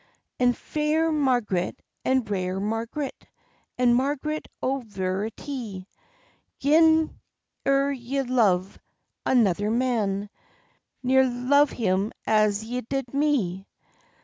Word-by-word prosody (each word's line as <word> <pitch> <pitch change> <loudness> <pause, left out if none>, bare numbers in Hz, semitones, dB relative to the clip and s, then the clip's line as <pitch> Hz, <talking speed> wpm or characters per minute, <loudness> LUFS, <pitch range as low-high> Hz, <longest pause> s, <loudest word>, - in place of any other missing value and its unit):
"And 245 -1 +3
fair 310 +2 0
Marg'ret, 245 - +1 0.3
and 260 -2 +1
rare 185 -2 -2
Marg'ret, 225 +7 -4 0.5
And 245 -1 +4
Marg'ret, 290 +4 -1
o' 270 +1 0
veritie, 205 +1 -4 0.7
Gin 315 +2 +4 0.5
ere 275 +1 +3
ye 270 +1 -2
love 205 -7 +1 0.5
another 205 -5 +3
man, 215 -4 0 0.7
Ne'er 260 +1 +4
love 270 +4 +3
him 200 -2 0
as 215 -1 +2
ye 245 +3 -3
did 265 +1 -4
me." 240 -11 0
245 Hz, 95 wpm, -25 LUFS, 205-275 Hz, 0.7 s, And